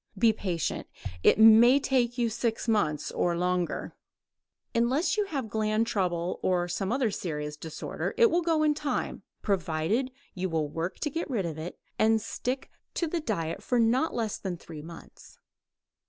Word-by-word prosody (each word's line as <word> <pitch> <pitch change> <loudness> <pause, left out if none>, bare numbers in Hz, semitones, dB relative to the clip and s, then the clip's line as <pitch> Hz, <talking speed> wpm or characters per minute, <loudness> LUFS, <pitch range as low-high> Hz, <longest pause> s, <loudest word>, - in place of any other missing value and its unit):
Be 225 +2 +5
patient; 180 -7 -2 0.3
it - - +5
may 225 +4 +8
take 250 -3 +1
you 240 -1 +2
six 225 +1 -2
months 155 -10 +1
or 170 -1 0
longer. 180 0 -1 0.8
Unless 255 +8 +2
you 420 -1 +1
have 275 - -3
gland 215 +1 +1
trouble 180 -5 -1
or 175 -1 +1
some 190 +3 -2
other 250 -3 +1
serious 150 -5 -4
disorder 160 +1 -5
it 465 -2 +6
will 345 - +3
go 325 -2 +2
in 305 -1 +4
time, 295 -1 -2 0.2
provided 195 +5 0 0.2
you 185 0 -2
will 160 -2 0
work 165 +5 -4
to 300 - -1
get 330 +2 -3
rid 220 -9 0
of 160 -2 -4
it 170 +3 -6 0.2
and 220 0 +4
stick 255 +4 -4 0.2
to 340 - +1
the 335 +1 -1
diet 165 - -2
for 245 - 0
not 245 +7 +3
less 225 -3 -2
than 185 -3 -4
three 160 -2 -10
months. 165 +2 -13
215 Hz, 170 wpm, -28 LUFS, 175-255 Hz, 0.8 s, may